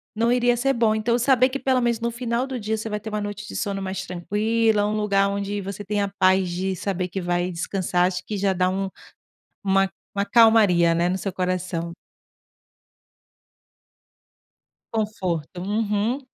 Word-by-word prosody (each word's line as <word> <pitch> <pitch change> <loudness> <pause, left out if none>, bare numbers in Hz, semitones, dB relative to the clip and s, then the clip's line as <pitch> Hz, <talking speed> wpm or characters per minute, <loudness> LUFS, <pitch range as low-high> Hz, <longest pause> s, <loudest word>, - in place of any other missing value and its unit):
não 230 +2 +2
iria 245 -1 +3
ser 270 +2 +2
bom, 230 -3 +2
então 235 +2 +1
saber 255 +1 +4
que 275 - -3
pelo 260 -2 +2
menos 235 -1 +1
no 235 - -1
final 240 +1 -1
do 260 -2 -5
dia 220 +1 -2
você 220 +1 -5
vai 210 0 -2
ter 220 - -11
uma 210 0 -2
noite 205 +1 -5
de - - -8
sono 200 -2 -2
mais 190 0 -4
tranquila, 210 +4 +1
um 210 - 0
lugar 200 -2 +2
onde 200 0 -3
você 200 +1 -6
tem 205 0 -1
a 200 - -1
paz 185 -1 +4
de 185 +2 -2
saber 185 0 -2
que 190 +1 -4
vai 175 +1 0
descansar, 180 +1 0
acho 180 -1 -3
que 210 - -4
já 195 0 +1
dá 185 0 +1
um 195 +1 -2 0.8
uma 195 0 +3 0.2
uma 200 0 0
calmaria, 205 -7 +5
né, 170 +1 +2
no 190 - -1
seu 195 +1 -3
coração. 180 -2 -2 3.0
Conforto, 185 -7 -3
uhum. 210 +4 0
200 Hz, 175 wpm, -23 LUFS, 185-225 Hz, 3.0 s, calmaria